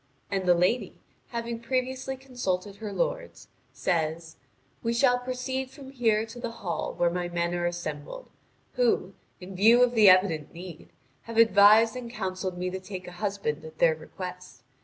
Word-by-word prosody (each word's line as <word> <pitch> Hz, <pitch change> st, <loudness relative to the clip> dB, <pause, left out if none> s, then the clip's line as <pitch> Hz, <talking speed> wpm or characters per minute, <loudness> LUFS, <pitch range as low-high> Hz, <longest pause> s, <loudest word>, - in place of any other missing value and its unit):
And 190 Hz, -2 st, -1 dB
the 175 Hz, -, +6 dB
lady, 180 Hz, +8 st, +1 dB, 0.3 s
having 235 Hz, -1 st, -4 dB
previously 260 Hz, +2 st, -2 dB
consulted 205 Hz, -7 st, -3 dB
her 215 Hz, -1 st, -6 dB
lords, -, -, -3 dB, 0.2 s
says: 160 Hz, -2 st, -2 dB, 0.4 s
"We 230 Hz, 0 st, 0 dB
shall 245 Hz, 0 st, +4 dB
proceed 255 Hz, +1 st, -3 dB
from 270 Hz, 0 st, -12 dB
here 225 Hz, -4 st, +1 dB
to 225 Hz, +2 st, -11 dB
the 240 Hz, -1 st, -3 dB
hall 200 Hz, -7 st, -4 dB
where 170 Hz, -1 st, +2 dB
my 175 Hz, 0 st, -2 dB
men 170 Hz, 0 st, -1 dB
are 175 Hz, 0 st, 0 dB
assembled, 175 Hz, -, -6 dB, 0.5 s
who, 235 Hz, -6 st, +1 dB, 0.3 s
in 185 Hz, +1 st, -9 dB
view 230 Hz, +6 st, +6 dB
of 245 Hz, -1 st, +2 dB
the 215 Hz, -4 st, +7 dB
evident 185 Hz, -6 st, +3 dB
need, 175 Hz, -2 st, -10 dB, 0.4 s
have 230 Hz, -1 st, -7 dB
advised 225 Hz, 0 st, +6 dB
and 250 Hz, -2 st, -6 dB
counselled 185 Hz, -5 st, -4 dB
me 180 Hz, +1 st, -2 dB
to 190 Hz, -, -4 dB
take 185 Hz, -1 st, -8 dB
a -, -, -7 dB
husband 200 Hz, -8 st, -2 dB
at 160 Hz, 0 st, -11 dB
their 165 Hz, 0 st, +4 dB
request. 180 Hz, -4 st, -9 dB
200 Hz, 165 wpm, -27 LUFS, 180-245 Hz, 0.5 s, the